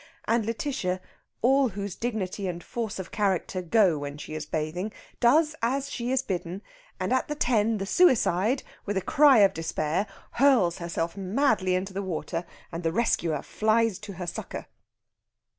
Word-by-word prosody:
And 230 -1 +1
Lætitia, 225 -5 -2 0.4
all 265 +1 +4
whose 200 -1 -5
dignity 205 -4 -3
and 175 -1 -4
force 225 -3 -4
of 190 - -7
character 190 -2 0
go 180 -3 +3
when 145 0 -5
she 150 - -8
is 155 -1 -5
bathing, 160 +7 -2 0.3
does 305 +6 +4
as 270 +4 0
she 240 0 -3
is 265 0 +1
bidden, 180 -2 -4 0.4
and, - - 0
at 260 - +1
the 300 - -3
"ten," 225 -5 +2
the 195 - -3
suicide, 240 - +3 0.2
with 205 -1 -1
a - - +1
cry 285 -4 +6
of 195 -1 +5
despair, 165 +3 -1 0.2
hurls 240 -11 +3
herself 170 -1 -3
madly 195 -1 +1
into 190 +1 -3
the 195 - -2
water, 175 -2 -3 0.3
and 165 0 -4
the 165 -2 0
rescuer 170 -7 0
flies 220 -2 +1
to 210 -1 -8
her 180 0 -6
succour. 175 - -5
200 Hz, 165 wpm, -27 LUFS, 175-235 Hz, 0.4 s, cry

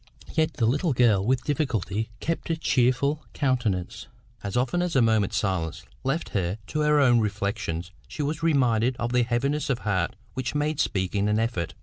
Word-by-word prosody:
Yet 155 -2 +1
the 115 - +1
little 145 +7 +1
girl 115 -6 +4
with 130 +3 +1
difficulty 110 - -1
kept 165 +6 -3
a 165 - 0
cheerful 140 +1 +1
countenance; 120 -10 -1 0.3
as 100 +2 -3
often 130 +8 +1
as 180 -3 -1
a - - +5
moment's 110 -3 +2
silence 85 -4 -2 0.2
left 140 +5 -1
her 95 0 -1
to 155 - -3
her 150 0 +4
own 120 -4 +5
reflections 100 -5 -2 0.2
she 150 - -4
was 150 +3 -2
reminded 130 -6 +2
of 120 +1 -2
the 125 - +4
heaviness 135 +6 0
of 130 - +1
heart 95 -4 0 0.2
which 130 +2 -3
made 150 0 0
speaking 100 +2 0
an 105 - +2
effort. 110 -7 -1
120 Hz, 180 wpm, -26 LUFS, 100-145 Hz, 0.3 s, a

